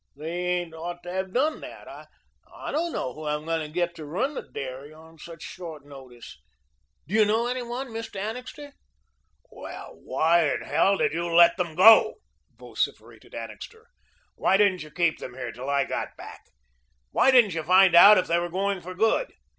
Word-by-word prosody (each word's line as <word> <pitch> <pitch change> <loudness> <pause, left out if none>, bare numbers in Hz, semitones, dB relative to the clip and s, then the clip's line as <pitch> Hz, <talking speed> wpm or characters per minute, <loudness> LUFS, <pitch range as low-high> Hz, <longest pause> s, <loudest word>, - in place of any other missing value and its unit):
They 155 +3 -7 0.3
ain't 175 -2 -8
ought 175 +2 -7
to 175 - -7
have 190 0 -3
done 295 +8 0
that. - - -11 0.6
I - - -7
don't 335 +3 -1
know 130 - -4
who 155 0 -8
I'm 150 +1 -3
to 165 -2 -2
get 175 +2 -2
to 155 - -8
run 215 - -2
the - - -5
dairy 135 +2 -8
on 160 +1 -17
such 165 0 -11
short 160 -6 -9
notice. 130 -4 -13 0.7
Do 180 - -9
you 220 0 +5
know 220 +3 +1
any 250 +1 -2
one, 245 +2 -6
Mr. 225 -3 -7
Annixter?" 250 +7 -7 0.8
"Well, - - -10
why 165 -1 +2
in - - -5
hell 195 0 +2
did - - 0
you 170 +1 -3
let 170 0 +6
them 175 -4 -3
go?" 215 +6 +7 0.4
vociferated - - -5
Annixter. 450 -1 -10 0.4
"Why 190 - +2
didn't 195 -3 +2
you 155 - -9
keep 170 0 0
them 125 - -9
here 125 -3 -6
till 125 +4 -7
I 140 -1 +2
got - - -5
back? - - -12 0.6
Why - - +3
didn't 240 -8 +5
you 165 - -2
find 185 +2 +5
out 200 +5 +9
if 185 - +1
they 170 +1 +1
were 175 0 -3
going 195 +1 -2
for 185 +2 -9
good? 225 - +1
175 Hz, 185 wpm, -25 LUFS, 155-215 Hz, 0.8 s, out